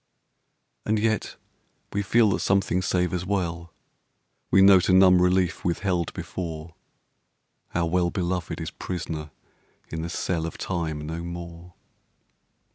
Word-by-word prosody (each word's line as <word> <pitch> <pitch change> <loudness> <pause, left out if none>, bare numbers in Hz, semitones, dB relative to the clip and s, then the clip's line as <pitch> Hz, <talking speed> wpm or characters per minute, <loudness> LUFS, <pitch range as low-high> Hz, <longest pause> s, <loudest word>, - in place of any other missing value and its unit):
And 110 +1 +1
yet 110 0 0 0.6
we 100 - 0
feel 110 +2 +3
that - - 0
something 95 -2 +1
savours 90 -1 0
well; 85 -3 -2 0.8
We 95 +1 +6
note 95 -2 +6
a - - +5
numb 90 -1 +6
relief 90 -1 +2
withheld 90 -1 0
before; 80 -2 -6 1.0
Our 85 -1 +1
well 90 +1 +1
beloved 90 -1 -2
is - - -5
prisoner 80 -4 -5 0.6
in 80 - -4
the 85 - -4
cell 85 -1 -2
Of - - -7
Time 80 -5 -3
no 80 +2 -4
more. 85 0 -8
90 Hz, 125 wpm, -25 LUFS, 85-95 Hz, 1.0 s, We